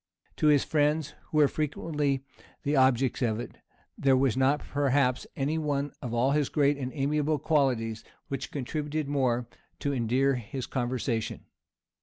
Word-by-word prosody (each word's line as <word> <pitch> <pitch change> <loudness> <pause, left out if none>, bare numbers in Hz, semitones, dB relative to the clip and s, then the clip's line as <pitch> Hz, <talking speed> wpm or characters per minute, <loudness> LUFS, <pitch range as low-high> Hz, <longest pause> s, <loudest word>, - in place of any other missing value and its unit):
To 155 - +2
his 145 -2 +5
friends 150 0 +1
who 155 - -3
were 150 -2 +6
frequently 145 -2 -1 0.4
the 145 +1 +1
objects 130 -1 +3
of 110 -3 +1
it, 120 - -8 0.4
there 135 -1 +3
was 130 -3 +2
not 135 +3 +2
perhaps 140 -2 +1
any 150 +4 0
one 145 -2 -1
of 125 -5 -4
all 120 +3 +2
his 145 -1 +1
great 145 -1 +3
and 130 -2 -4
amiable 150 +2 +1
qualities 130 -7 +1 0.2
which 135 - -4
contributed 150 +2 -3
more 125 -4 +1 0.3
to 140 - -1
endear 130 +3 +2
his 125 +2 -5
conversation. 120 -3 -2
140 Hz, 150 wpm, -28 LUFS, 125-145 Hz, 0.4 s, were